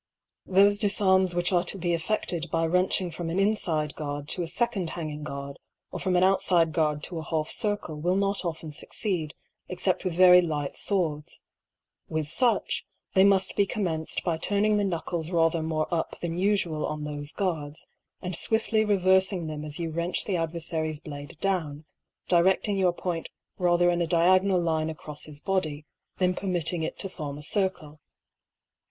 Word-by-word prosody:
Thole 195 +2 +6
difarms 190 -3 +2
which 175 +1 +1
kve 175 -2 +3
to - - -1
be 175 -1 -1
effeded 170 -1 -1
by 165 +1 +1
wrenching 180 +1 +1
from 165 +1 -5
an 170 - -2
infide 170 -8 0
guard 145 -1 -5
to 180 - -1
a 170 - -2
feconde 215 -4 -1
hanging 155 -3 -5
guard, 140 -2 -6 0.3
or - - -5
from 185 -1 0
an 180 - +4
outiide 180 -3 +3
guard 150 -2 0
to 170 -3 -4
a - - -6
half 155 +1 -2
circle 205 -8 -2
will 180 +3 +1
not 200 0 0
often 160 -2 -4
fucceed, 160 0 -4 0.3
except 180 0 0
with 185 -3 -2
very 180 0 +8
light 150 -4 -2
fwords. 160 -7 -2 0.7
With 155 -1 -1
fiich, 230 - +1 0.3
they 190 - +6
muft 195 -1 +3
be 200 - +3
commenced 165 -7 -2
by 165 -3 -1
turning 210 +3 +2
the 205 - +1
knuckles 170 -2 -3
rather 165 -2 +2
more 155 -1 -1
up 165 - -2
than 170 -1 -3
ufual 185 -6 +1
on 150 0 -4
thofe 145 0 -5
guards, 155 -6 -3 0.4
and 180 0 -3
fwiftly 220 +4 +1
reverfing 190 -3 +2
them 150 -1 -5
as 150 -1 -6
you 165 -2 -3
wrench 170 +2 -1
the 195 - -1
adverfary's 160 -2 -2
blade 145 -3 -9
down, 160 -6 -1 0.4
dirediing 190 +3 +3
your 185 -2 +4
point 175 -2 -4 0.3
rather 175 -1 +3
in 175 0 0
a 170 - +1
diagonal 185 +3 +4
line 160 -2 0
acrofs 155 -1 -5
his 145 -1 -9
body, 155 -6 -1 0.3
than 180 -1 +2
permitting 175 -3 0
it 160 - -3
to - - -3
form 150 -6 -6
a 150 - -9
circle. 160 -4 -2
170 Hz, 170 wpm, -27 LUFS, 155-190 Hz, 0.7 s, very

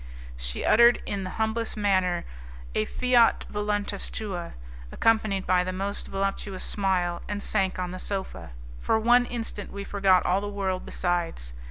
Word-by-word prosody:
She - - -3
uttered 235 +2 +6
in 200 -2 -3
the 185 - -4
humblest 220 +1 -1
manner 185 -4 +1 0.5
a 110 - +1
'fiat 245 - +3
voluntas 205 -1 -2
tua', 185 -6 -4 0.4
accompanied 215 -4 +2
by 180 0 +3
the 185 - -3
most 195 +2 -2
voluptuous 195 0 -3
smile, 180 -3 0
and 205 0 -4
sank 190 -1 0
on 180 -1 -3
the 185 - -6
sofa. 195 - -5 0.3
For 220 - +2
one 240 +2 +4
instant 225 -4 -5
we 200 0 -5
forgot 195 -2 +3
all 185 +2 +2
the 205 - -4
world 190 -2 -2
besides. 170 - -2
195 Hz, 155 wpm, -26 LUFS, 185-210 Hz, 0.5 s, uttered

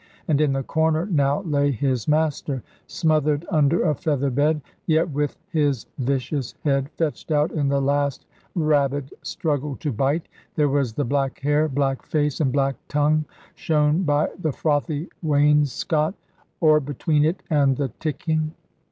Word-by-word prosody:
And 150 -2 +2
in 145 -3 +2
the 135 0 -1
corner 160 +3 +1
now 145 -2 +1
lay 145 -4 +1
his 130 -3 -1
master, 150 -4 0 0.2
smothered 155 -1 +1
under 155 0 +3
a 155 - +2
feather 140 -2 -1
bed; 150 +4 +2 0.3
yet 160 +1 +2
with 145 0 -1
his 145 -6 +1
vicious 135 0 -2
head 140 -2 +1
fetched 160 -1 -2
out 150 0 +2
in 145 -3 0
the 140 0 +2
last 140 0 0 0.3
rabid 145 -4 +1
struggle 145 -3 -2
to 150 - -3
bite. 135 +8 0 0.3
There 150 -2 +2
was 135 -4 0
the 145 +4 -1
black 135 +1 -1
hair, 145 +2 +2
black 135 -1 0
face, 150 -1 -1
and 135 -4 +2
black 135 0 +1
tongue, 150 +1 +2 0.3
shown 150 +1 +1
by 150 -3 +2
the 160 -4 0
frothy 145 +2 -1
wainscot, 150 - +2 0.4
or 155 -3 +5
between 145 +2 0
it 160 +5 0
and 140 -4 +3
the 140 -2 -1
ticking. 155 +1 -1
145 Hz, 150 wpm, -23 LUFS, 140-155 Hz, 0.4 s, or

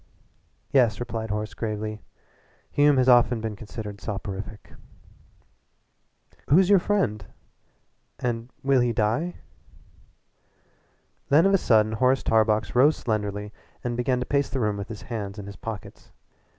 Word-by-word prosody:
"Yes," 120 -6 +3
replied 115 -2 -4
Horace 105 0 -3
gravely, 110 0 -4 0.7
"Hume 145 -1 +4
has 130 0 +3
often 120 -1 +5
been 110 -1 -4
considered 105 -1 -8
soporific 100 0 -6 0.9
" - - -37
"Who's 180 +7 +5
your 200 - +7
friend 140 - 0 0.9
and 120 -1 -3
will 135 -1 +3
he 120 -1 +1
die?" 115 +11 0 1.9
Then 155 +5 +5
of 195 - +4
a 195 - +5
sudden 110 -6 +3
Horace 130 +4 +2
Tarbox 110 -1 +2
rose 140 +5 +4
slenderly 105 -2 -3 0.3
and 120 -1 -2
began 125 +1 0
to 125 - -3
pace 140 0 0
the 135 - -2
room 105 -3 0
with 100 0 -5
his 110 -3 -8
hands 105 -4 -5
in 100 - -7
his 100 0 -9
pockets. 110 -2 -8
115 Hz, 135 wpm, -25 LUFS, 105-130 Hz, 1.9 s, your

